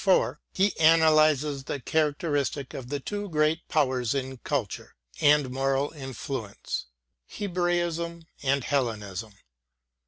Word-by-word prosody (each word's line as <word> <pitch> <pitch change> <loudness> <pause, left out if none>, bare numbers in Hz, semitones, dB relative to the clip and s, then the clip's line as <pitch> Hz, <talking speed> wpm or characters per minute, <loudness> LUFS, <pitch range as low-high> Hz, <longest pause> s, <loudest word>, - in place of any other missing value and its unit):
— 190 -2 +1
^he 195 +1 +3
analyses 155 -3 +4
the 140 - -3
characteristics 145 -1 0
of 125 -2 -7
the 145 0 -2
two 205 +7 -4
great 155 +1 +1
powers 130 -5 +1
in 130 -1 -3
culture - - -3 0.2
and 145 -3 +4
moral 135 +2 0
influence, 130 -6 -5 0.4
Hebraism 175 -3 -1 0.2
and 140 -1 +1
Hellenism. 110 -7 -2
145 Hz, 105 wpm, -27 LUFS, 130-160 Hz, 0.4 s, analyses